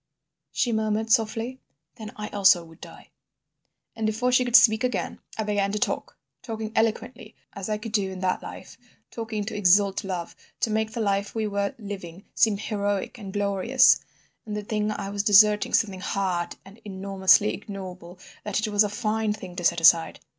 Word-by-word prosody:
she 240 - 0
murmured, 220 0 -1
softly. 225 +3 0 0.4
"'Then—I 210 -1 -7
also 195 -3 +4
would 165 +1 -18
die.' - - -13 0.8
"And 220 -1 -1
before 235 +4 0
she 255 0 +4
could 245 -1 0
speak 225 -2 +6
again 250 -5 -2 0.2
I 220 - -1
began 205 -1 0
to - - -1
talk, - - -3 0.2
talking 220 -2 -5
eloquently—as 220 -3 -3
I 215 - 0
could 215 +1 -8
do 200 -3 0
in 185 - -7
that 185 -1 0
life—talking 220 -2 -8
to 215 - -5
exalt 200 0 +3
love, 180 -3 -5 0.3
to 225 - 0
make 220 0 -1
the 230 - -3
life 200 0 -1
we 220 -1 -1
were 200 -1 -2
living 195 -4 -8
seem 215 -3 +3
heroic 205 +1 -3
and 195 -3 -8
glorious; 205 +6 +3 0.4
and 210 -1 -5
the 210 - -4
thing 210 0 -2
I 200 -2 -4
was 200 0 -1
deserting 210 0 +5
something 200 -4 0
hard 185 -3 -2
and 195 +3 -15
enormously 195 0 +2
ignoble 185 -3 -9 0.3
that 210 +1 -1
it 215 - -4
was 205 +1 +4
a 210 - -1
fine 215 0 -1
thing 190 -4 -10
to 175 - -4
set 170 0 +2
aside. 165 0 +4
210 Hz, 175 wpm, -25 LUFS, 195-220 Hz, 0.8 s, speak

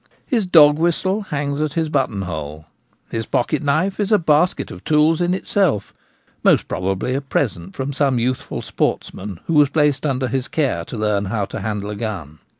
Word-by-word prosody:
His 230 - 0
dog 150 -4 +6
whistle 185 +5 +1
hangs 145 0 -2
at 155 -1 -1
his 160 -1 0
buttonhole. 80 - -3 0.5
His 115 -1 -3
pocket 140 +4 0
knife 160 +8 0
is 205 0 0
a 210 - +6
basket 160 0 +1
of - - -10
tools 155 +2 +3
in 175 +1 +2
itself, 185 - 0 0.5
most - - +4
pro - - -4
bably 125 +7 -2
a 140 - -1
present 105 -10 -2
from 135 +1 -3
some 135 -2 +1
youthful 125 +2 -2
sportsman 95 -3 -3
who 165 - -1
was 150 -2 +5
placed 150 -2 +1
under 135 -3 0
his 130 +1 -2
care 135 - 0
to 120 - -7
learn 105 -2 0
how 100 0 -1
to - - -6
handle 105 0 -3
a - - -5
gun. 95 -9 -5
140 Hz, 185 wpm, -20 LUFS, 105-155 Hz, 0.5 s, dog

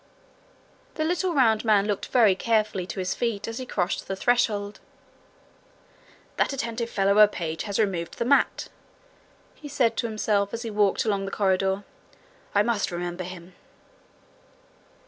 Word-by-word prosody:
The 310 - -1
little 350 +1 0
round 225 -5 +3
man 210 -3 +3
looked 205 -2 -2
very 225 -6 +4
carefully 215 -3 0
to - - -7
his 185 0 -1
feet 230 -4 -2
as 225 +1 -5
he 255 - -6
crossed 180 -4 -2
the 195 - -3
threshold. 210 -2 0 1.6
'That - - +1
attentive 235 -2 -3
fellow 195 -2 +1
of 200 - +3
a 210 0 +9
page 160 -5 -4
has 200 -2 -2
removed 185 -6 -1
the 235 - -1
mat,' 280 +3 +2 0.8
he 300 - -11
said 245 -5 +1
to 235 - 0
himself, 210 -2 0
as 235 - -6
he 225 - -5
walked 205 0 +1
along 200 -3 0
the - - -4
corridor. 195 0 0 0.7
'I 205 - +5
must 230 -3 0
remember 175 +1 -4
him.' 180 0 -10
210 Hz, 155 wpm, -25 LUFS, 195-230 Hz, 1.6 s, a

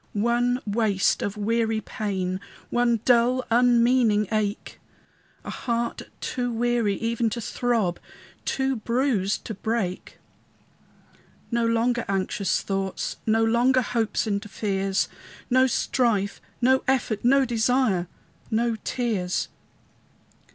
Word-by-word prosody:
One 240 +3 +1
waste 205 -2 +1
of 205 +1 -3
weary 225 +1 0
pain, 190 -4 -3 0.3
One 240 -2 +2
dull, 250 +1 +3
unmeaning 235 -3 +4
ache, 215 -1 -2 0.6
A - - -6
heart 235 -1 -2 0.2
too 245 -1 -2
weary 235 -3 +1
even 230 +2 0
to 235 - -4
throb, 230 -6 -1 0.4
Too 265 0 0
bruised 230 -4 0
to 220 - -4
break. 205 -3 -3 1.3
No 235 -1 +1
longer 235 +1 +1
anxious 195 0 0
thoughts, 195 -1 -3
No 225 +1 +3
longer 250 +3 +3
hopes 230 -3 -1
and 200 -1 -1
fears, 195 -2 -1 0.4
No 260 +1 +5
strife, 225 -5 0 0.2
no 260 +1 +4
effort, 245 -5 0
no 270 +2 +4
desire, 230 -5 +1 0.4
No 230 +1 0
tears. 210 -8 -1
230 Hz, 110 wpm, -25 LUFS, 205-245 Hz, 1.3 s, No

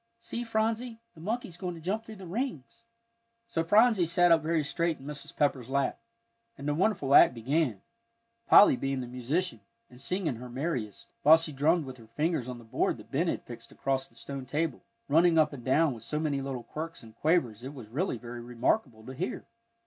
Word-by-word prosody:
See, 235 +1 -5
Phronsie, 225 +1 -1
the 160 - -14
monkey's 205 -2 -3
going 180 -1 -4
to - - -10
jump 195 +7 -2
through 220 -1 -10
the 190 -2 -10
rings." 230 - -5 0.6
So 170 -8 -1
Phronsie 210 0 +4
sat 175 +1 +4
up 165 -1 +6
very 160 0 +1
straight 165 +3 -1
in 135 - -14
Mrs. 145 -1 -7
Pepper's 135 -4 +1
lap, 140 0 0 0.6
and 140 - -6
the 150 - +2
wonderful 155 -5 +1
act 125 - +8
began, 125 - 0 0.6
Polly 200 - +8
being 135 0 -2
the - - -4
musician, 125 +9 -2 0.3
and 125 - -13
singing 175 - -1
her 125 +1 -9
merriest, 120 - -4
while 155 +3 +8
she 160 -1 -3
drummed 155 +4 +2
with 130 -1 -8
her 115 -2 -15
fingers 150 +2 -1
on 125 -1 -5
the 120 - -12
board 115 - 0
that - - -14
Ben - - +1
had - - -2
fixed - - -11
across 135 0 -1
the 115 - -26
stone 135 +2 -7
table, 150 -1 -2 0.2
running 165 +2 +4
up 155 -2 +4
and 125 -4 -8
down 145 +3 +3
with 115 - -10
so 150 +7 -3
many 145 -3 -1
little 135 -3 -4
quirks 165 +2 -7
and 110 -1 -13
quavers 130 -9 +1
it 135 +3 -7
was 120 -5 -9
really 140 - -2
very 120 +1 -8
remarkable 120 - -1
to 130 - -7
hear. 170 +8 -4
150 Hz, 205 wpm, -29 LUFS, 125-175 Hz, 0.6 s, act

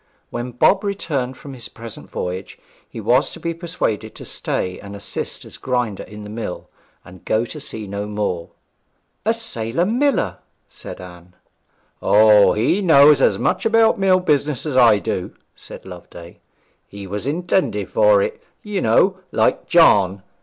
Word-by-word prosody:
When 120 +1 -4
Bob 155 - +3
returned 145 -11 -3
from 140 - -10
his 120 -3 -7
present 115 -2 -10
voyage, 90 +2 -5 0.3
he - - -8
was 125 +6 +2
to - - -9
be 170 0 -3
persuaded 165 - -3
to - - -9
stay 90 0 -3
and 100 0 -9
assist 100 0 -5
as - - -11
grinder 125 -5 -2
in 105 0 -10
the 105 - -9
mill, 110 -5 -6 0.3
and 90 -1 -14
go 110 +2 0
to 150 - -8
sea 110 -7 -6
no 100 +1 -5
more. 105 -5 -3 0.8
'A 225 +1 +2
sailor 135 - -2
miller!' 250 +3 0 0.3
said - - -10
Anne. 90 0 -13 0.7
'O, 105 -1 +6
he 120 - +1
knows 145 -5 +6
as - - +3
much - - 0
about 225 -1 +3
mill 190 -1 +4
business 150 -5 0
as 150 -4 -3
I 120 -4 +6
do,' 90 -2 -4 0.2
said - - -12
Loveday; 85 -2 -12 0.5
'he 100 -1 -9
was 105 +6 -5
intended 175 +5 0
for - - +4
it, 470 -1 -4 0.2
you 205 -3 -3
know, 190 -1 +3
like - - +1
John. 100 - +4
125 Hz, 160 wpm, -20 LUFS, -, 0.8 s, O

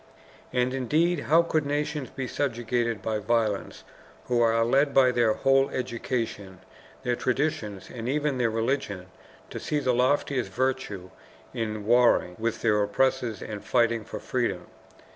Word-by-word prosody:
And 125 0 +1
indeed 155 +7 +1
how 165 +2 +5
could 160 -2 0
nations 145 -1 -2
be 130 -2 -5
subjugated 120 -5 -1
by 110 0 -1
violence 110 -1 -1 0.4
who 120 -1 +1
are 115 0 +3
led 140 +4 +2
by 130 -2 +6
their 120 -3 +3
whole 135 +3 +3
education, 115 -6 -4 0.4
their 125 -1 0
traditions, 125 -8 -2
and 120 0 -5
even 145 -1 0
their 120 -2 +2
religion 110 -5 -2 0.4
to - - -5
see 150 - -2
the 130 -3 +1
loftiest 130 +1 +1
virtue 125 -8 -2 0.4
in 110 -2 -3
warring 120 -6 +4
with 115 0 -2
their 105 -2 +3
oppressors 120 +1 0
and 105 -2 -6
fighting 115 -2 +2
for - - -7
freedom? - - -2
120 Hz, 145 wpm, -26 LUFS, 110-135 Hz, 0.4 s, by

